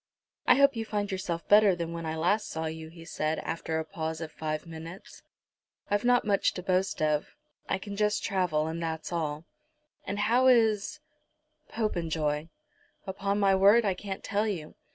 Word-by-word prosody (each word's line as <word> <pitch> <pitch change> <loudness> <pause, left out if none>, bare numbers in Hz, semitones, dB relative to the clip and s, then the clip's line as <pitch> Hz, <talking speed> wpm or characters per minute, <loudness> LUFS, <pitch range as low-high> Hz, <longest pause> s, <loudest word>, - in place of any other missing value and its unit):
"I - - +7
hope 280 -1 +5
you 225 - -2
find 205 -2 -2
yourself 175 -3 -3
better 205 -2 +6
than 170 -1 -4
when 165 -1 -5
I 160 - -2
last 205 +7 +1
saw 160 0 -3
you," 160 0 -5
he 165 0 -13
said, 155 -1 -1
after 160 -1 -3
a 160 - -2
pause 160 -2 -4
of 160 -2 -6
five 155 0 -4
minutes. 165 +2 -10 0.7
"I've 205 0 +2
not 245 -1 +3
much 200 -1 +2
to 180 - -5
boast 185 -2 0
of. 150 -1 0 0.3
I - - +1
can 200 +1 -7
just 210 0 +1
travel, 180 -6 +1
and 165 +1 -4
that's 160 +1 -4
all." 155 -1 -2 0.6
"And 200 - -2
how 240 +5 +3
is 230 +3 +3 0.7
Popenjoy?" 160 -8 -1 0.6
"Upon 200 +1 -1
my 195 -1 +4
word 200 +4 +6
I 195 - +2
can't 190 +1 -6
tell 210 +1 0
you. 170 -7 -4
185 Hz, 175 wpm, -29 LUFS, 160-205 Hz, 0.7 s, I